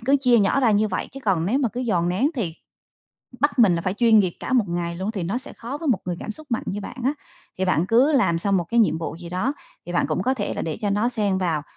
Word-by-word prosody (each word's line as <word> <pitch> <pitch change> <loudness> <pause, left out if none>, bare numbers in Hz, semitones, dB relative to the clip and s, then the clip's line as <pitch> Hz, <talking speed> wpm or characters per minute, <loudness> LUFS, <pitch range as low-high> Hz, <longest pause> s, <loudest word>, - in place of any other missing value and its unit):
cứ 270 +5 +3
chia 245 -3 +4
nhỏ 205 +7 +2
ra 235 -4 +4
như 210 +1 +2
vậy, 185 - -3
chứ 275 - -8
còn 180 -4 +1
nếu 250 +7 +1
mà 265 -4 +1
cứ 245 - -3
dồn 185 -9 0
nén 210 +12 +1
thì 190 - -2 0.9
bắt 290 -1 +1
mình 205 -8 +6
là 170 - -3
phải 185 +1 -1
chuyên 225 0 +5
nghiệp 185 -4 +2
cả - - -4
một 245 -5 +4
ngày 170 0 -3
luôn, 190 +4 -2
thì 200 -5 -4
nó 195 +9 -1
sẽ - - -7
khó 255 +5 -6
với 320 -3 -3
một 230 - +3
người 175 -1 -3
cảm - - -5
xúc 310 +6 -11
mạnh 235 - 0
như 205 - -3
bạn 205 - -8
á. 270 - +2 0.5
Thì 190 - +1
bạn 180 -2 +1
cứ 250 +9 +4
làm 200 - +3
xong 200 +2 +1
một 175 - 0
cái 235 +8 +2
nhiệm 185 -7 +2
vụ 160 - -4
gì 170 0 -9
đó, 185 +10 -1 0.3
thì - - -5
bạn - - +1
cũng - - -1
có 260 - +1
thể 205 -6 -3
là - - -3
để 160 +2 -3
cho 205 -3 -1
nó 210 +4 +1
xen 205 -6 0
vào 165 -5 0
210 Hz, 300 wpm, -23 LUFS, 180-245 Hz, 0.9 s, mình